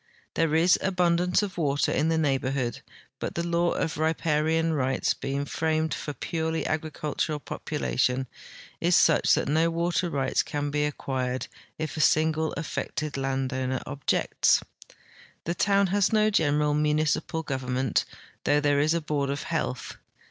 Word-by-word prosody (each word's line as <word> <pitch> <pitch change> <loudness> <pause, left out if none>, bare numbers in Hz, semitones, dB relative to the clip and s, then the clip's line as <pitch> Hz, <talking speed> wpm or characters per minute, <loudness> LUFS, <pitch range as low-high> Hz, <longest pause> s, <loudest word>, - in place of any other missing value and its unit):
There 160 -1 +1
is 170 +3 +4
abundance 180 0 +2
of 200 -2 -3
Avater 145 -5 0
in 160 - +1
the 165 - +1
neighborhood, 135 -4 0 0.4
but - - -4
the 170 - -1
laAV 170 0 +1
of 160 - -2
riparian 160 0 +1
rights, 130 -3 +1
being 140 +1 -3
framed 160 +1 0
for - - -5
a - - -3
purely 160 -1 -2
agricultural 155 -1 -2
population, 125 - -1 0.5
is 175 +1 +3
such - - +5
that - - -1
no 160 +3 +2
Avater 170 +1 0
rights 135 -3 +1
can 145 0 -3
be 150 0 +1
acquired 130 -4 -2 0.3
if 155 0 -4
a - - +1
single 160 +1 +2
affected 155 -2 -4
landoAvner 130 -1 -2
objects. 140 -1 +1 0.8
The 170 - -1
toAA 200 +3 +2
n 200 - +3
has 205 -2 +3
no 215 -1 +3
general 150 -5 +2
municipal 155 +2 0
government, 130 -2 -1 0.4
though 145 0 +3
there 145 -1 +2
is 155 +3 +2
a 170 - 0
board 145 -2 -1
of 140 +1 -3
health. 155 -6 -3
155 Hz, 150 wpm, -27 LUFS, 140-165 Hz, 0.8 s, such